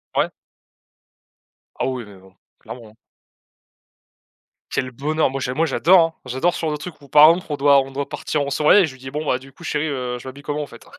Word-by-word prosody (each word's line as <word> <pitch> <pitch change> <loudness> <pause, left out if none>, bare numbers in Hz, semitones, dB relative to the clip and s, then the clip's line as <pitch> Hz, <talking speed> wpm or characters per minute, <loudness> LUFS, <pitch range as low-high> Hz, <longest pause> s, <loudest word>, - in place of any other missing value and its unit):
Ouais. - - +2 1.5
Ah - - -2
oui 130 -2 -3
mais 100 -1 -14
bon, 95 0 -19 0.3
clairement, 115 -3 -10
hein. 110 - -22 1.7
Quel 130 - -2
bonheur! 150 +5 0
Moi 135 +1 -4
j'a 125 -1 -3
moi 160 +4 +1
j'adore, 170 +5 +4
hein. 165 0 0
J'adore 130 +8 0
sur 160 - -2
le 150 - -2
truc 160 +3 -8
où 140 - -15
par 150 +3 +8
exemple 175 +2 +1
on 145 - -1
doit 140 0 +5
on 135 - -8
doit 140 +1 -4
partir 150 - -2
en 140 - -2
soirée 150 +8 +5
et - - +3
je 155 - -7
lui 130 - -16
dis: 130 0 -9
«Bon, 150 +2 -4
bah, 125 - 0
du 135 +1 -16
coup - - -16
chérie, 155 -1 -1
heu, 125 -3 -3
je 130 - -11
m'habille 140 +2 -10
comment 150 +1 -3
en 145 - -5
fait?» 120 - -15
140 Hz, 235 wpm, -21 LUFS, 130-155 Hz, 1.7 s, par